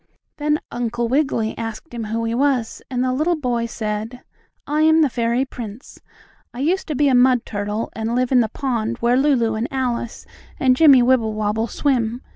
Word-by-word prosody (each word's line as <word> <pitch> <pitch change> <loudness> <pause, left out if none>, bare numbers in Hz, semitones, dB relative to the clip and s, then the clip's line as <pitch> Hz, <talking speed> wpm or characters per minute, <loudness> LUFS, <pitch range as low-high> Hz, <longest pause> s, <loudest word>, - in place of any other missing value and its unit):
Then 300 0 +1
Uncle 240 0 -2
Wiggily 250 -4 0
asked 225 +6 -6
him 230 -2 -4
who 225 +2 -2
he 225 - -1
was, 255 -3 0
and 250 -1 -1
the 255 0 0
little 310 +6 +1
boy 245 -6 -1
said: 220 +2 -5 0.4
"I 300 +1 0
am 315 +1 +5
the 285 - +1
fairy 235 +2 0
prince! 240 -1 -9 0.6
I - - -7
used 355 +7 0
to 305 - -3
be 290 +2 +2
a 270 - +3
mud 250 -1 +4
turtle, 210 +1 -3
and 225 +1 -3
live 250 0 0
in 255 - +5
the 225 -2 +1
pond 235 -2 -2
where 240 +1 +2
Lulu 255 -5 +2
and 220 +3 -2
Alice 245 -3 -3 0.3
and 255 -1 +4
Jimmie 275 -4 +6
Wibblewobble 220 -3 +1
swim. 245 -1 -1
245 Hz, 185 wpm, -21 LUFS, 225-270 Hz, 0.6 s, Jimmie